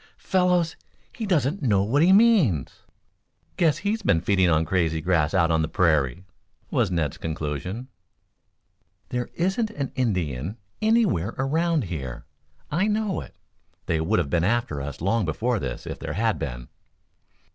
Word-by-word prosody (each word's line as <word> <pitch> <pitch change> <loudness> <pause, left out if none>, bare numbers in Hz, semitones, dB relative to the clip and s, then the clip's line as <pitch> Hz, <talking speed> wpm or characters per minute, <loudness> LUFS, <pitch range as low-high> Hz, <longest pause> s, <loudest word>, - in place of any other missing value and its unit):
"Fellows, 180 -3 +1 0.4
he 225 -3 -4
doesn't 160 -1 +1
know 105 -8 +2
what 130 +8 +2
he 175 +3 +5
means." 195 - +4 0.7
"Guess 165 -4 +2
he's 220 +2 0
been 130 - +3
feeding 95 0 +2
on 80 0 +2
crazy 80 -3 0
grass 80 -2 +1
out 85 -3 +3
on 80 0 +2
the 80 - 0
prairie," 80 -3 +1 0.5
was 120 -8 +2
Ned's 80 -6 -1
conclusion. 80 - -4 1.2
"There 125 0 -3
isn't 190 +6 0
an 145 -11 -4
Indian 90 - -2 0.2
anywhere 215 - +2
around 160 +3 +1
here. 70 - -6 0.5
I 185 +7 +1
know 210 -3 0
it. - - -12 0.5
They 80 -1 0
would 100 +7 +1
have 80 -6 -1
been 85 -2 +2
after 105 -8 0
us 70 +3 -6
long 105 +5 +1
before 110 +8 -1
this, - - -5
if - - -6
there - - -5
had - - 0
been." - - -5
100 Hz, 150 wpm, -25 LUFS, -, 1.2 s, he